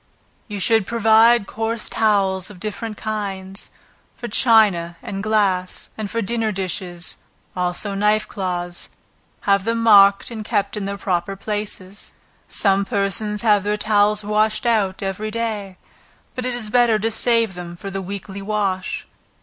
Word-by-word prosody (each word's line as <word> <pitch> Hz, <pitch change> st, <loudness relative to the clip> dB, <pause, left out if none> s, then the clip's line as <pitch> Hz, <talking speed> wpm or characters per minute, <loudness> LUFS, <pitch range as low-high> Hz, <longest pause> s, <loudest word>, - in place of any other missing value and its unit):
You 205 Hz, -3 st, -5 dB
should 220 Hz, 0 st, +2 dB
provide 225 Hz, 0 st, +4 dB
coarse 225 Hz, +2 st, -3 dB
towels 195 Hz, -4 st, +1 dB
of 200 Hz, -4 st, -12 dB
different 215 Hz, +2 st, -5 dB
kinds, 195 Hz, -3 st, -4 dB, 0.5 s
for 240 Hz, -, -6 dB
china 205 Hz, -8 st, +3 dB
and 195 Hz, 0 st, -5 dB
glass, 200 Hz, -4 st, 0 dB
and 215 Hz, -2 st, -5 dB
for 230 Hz, +2 st, -2 dB
the -, -, -3 dB
dinner 225 Hz, 0 st, 0 dB
dishes, 180 Hz, -2 st, -1 dB, 0.4 s
also 180 Hz, +3 st, -1 dB
knife 210 Hz, +2 st, +2 dB
cloths, 175 Hz, -2 st, -4 dB, 0.5 s
have 200 Hz, -1 st, +2 dB
them 230 Hz, +1 st, -1 dB
marked 200 Hz, -1 st, +6 dB
and 220 Hz, -2 st, -5 dB
kept 200 Hz, 0 st, -1 dB
in 205 Hz, -2 st, -3 dB
their 200 Hz, 0 st, -4 dB
proper 185 Hz, 0 st, -2 dB
places. 205 Hz, -1 st, -5 dB, 0.3 s
Some 195 Hz, -1 st, +2 dB
persons 200 Hz, +2 st, +1 dB
have 210 Hz, -3 st, +4 dB
their 210 Hz, +2 st, -1 dB
towels 210 Hz, 0 st, +2 dB
washed 215 Hz, +3 st, +1 dB
out 205 Hz, -5 st, +1 dB
every 195 Hz, +3 st, -3 dB
day, 215 Hz, -4 st, -4 dB, 0.6 s
but 255 Hz, 0 st, -3 dB
it 250 Hz, -, -2 dB
is 220 Hz, -3 st, -3 dB
better 240 Hz, -2 st, +4 dB
to 225 Hz, +2 st, -1 dB
save 230 Hz, -2 st, +2 dB
them 175 Hz, -1 st, -8 dB
for 195 Hz, +3 st, -7 dB
the 195 Hz, 0 st, -3 dB
weekly 200 Hz, +1 st, -7 dB
wash. 195 Hz, -2 st, -2 dB
205 Hz, 150 wpm, -21 LUFS, 195-220 Hz, 0.6 s, marked